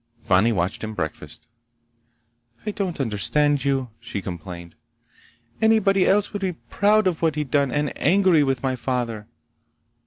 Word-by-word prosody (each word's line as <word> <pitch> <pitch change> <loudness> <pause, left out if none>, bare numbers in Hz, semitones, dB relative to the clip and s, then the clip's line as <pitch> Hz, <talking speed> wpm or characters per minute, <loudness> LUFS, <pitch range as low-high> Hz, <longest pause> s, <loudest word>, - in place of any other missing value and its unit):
Fani 95 +5 +3
watched 95 -1 -2
him 110 0 -5
breakfast. 80 -5 -5 1.2
"I 210 - -1
don't 190 -6 -3
understand 140 +5 +1
you," 135 -3 -1
she - - -5
complained. 85 -2 -8 0.9
"Anybody 210 -4 +4
else 205 +2 +2
would 205 - -4
be 185 -2 -1
proud 210 +5 +1
of 180 -4 0
what 160 -3 +1
he'd 150 -3 -3
done 140 -3 +2
and 150 +1 -1
angry 185 -1 +4
with 135 -2 -1
my 130 -1 0
father. 120 -4 -3
140 Hz, 145 wpm, -23 LUFS, -, 1.2 s, Anybody